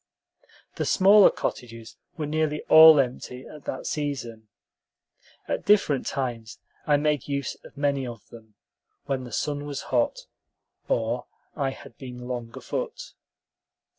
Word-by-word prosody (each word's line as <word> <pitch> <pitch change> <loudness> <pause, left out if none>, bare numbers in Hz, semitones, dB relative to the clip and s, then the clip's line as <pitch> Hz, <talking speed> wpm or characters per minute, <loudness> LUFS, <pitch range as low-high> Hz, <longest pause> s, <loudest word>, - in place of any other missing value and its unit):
The - - -1
smaller 200 +1 +6
cottages 115 -2 -6 0.2
were 155 - -2
nearly 155 0 -1
all 160 -1 +10
empty 125 -1 -3
at 150 -2 -12
that 130 - -5
season. 120 -7 -4 1.0
At - - -2
different 195 -10 +3
times 120 -4 -4 0.3
I 145 -1 +4
made 150 -2 0
use 140 -2 -2
of - - -15
many 140 -2 0
of 115 -3 -9
them, 110 -2 -15 0.5
when 135 -2 -2
the 120 - -10
sun 145 +5 -2
was 145 -1 -5
hot, 120 -2 +1 0.6
or 115 +2 -1 0.3
I 140 -3 0
had 120 -3 -12
been 125 -2 -8
long 120 -2 -5
afoot. - - -5
135 Hz, 135 wpm, -25 LUFS, 120-150 Hz, 1.0 s, all